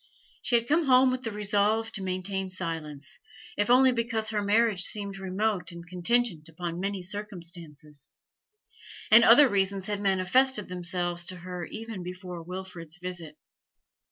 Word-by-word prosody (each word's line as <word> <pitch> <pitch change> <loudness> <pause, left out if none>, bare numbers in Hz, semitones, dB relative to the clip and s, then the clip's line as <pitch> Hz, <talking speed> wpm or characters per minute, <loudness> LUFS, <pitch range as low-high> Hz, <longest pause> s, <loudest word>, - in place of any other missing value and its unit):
She 240 - +1
had 235 0 +2
come 315 +4 +3
home 255 -1 +6
with 255 0 -2
the 225 -4 -4
resolve 210 +2 +1
to 210 - -5
maintain 190 +1 -2
silence, 165 -6 -5 0.4
if 205 +2 0
only 260 +1 +6
because 230 -2 -1
her 215 -1 -1
marriage 210 -1 +2
seemed 200 -1 -1
remote 190 -1 -1
and 170 0 -10
contingent 180 -2 0
upon 170 +1 -5
many 195 0 -2
circumstances; 170 -7 -7 1.0
and 225 +2 +9
other 255 +6 +8
reasons 195 -3 0
had 205 -1 -3
manifested 205 +5 +2
themselves 175 -1 -2
to 185 - -4
her 180 0 -6
even 225 -1 -6
before 180 -1 -7
Wilfrid's 175 -2 -7
visit. 175 -4 -7
190 Hz, 145 wpm, -28 LUFS, 175-220 Hz, 1.0 s, and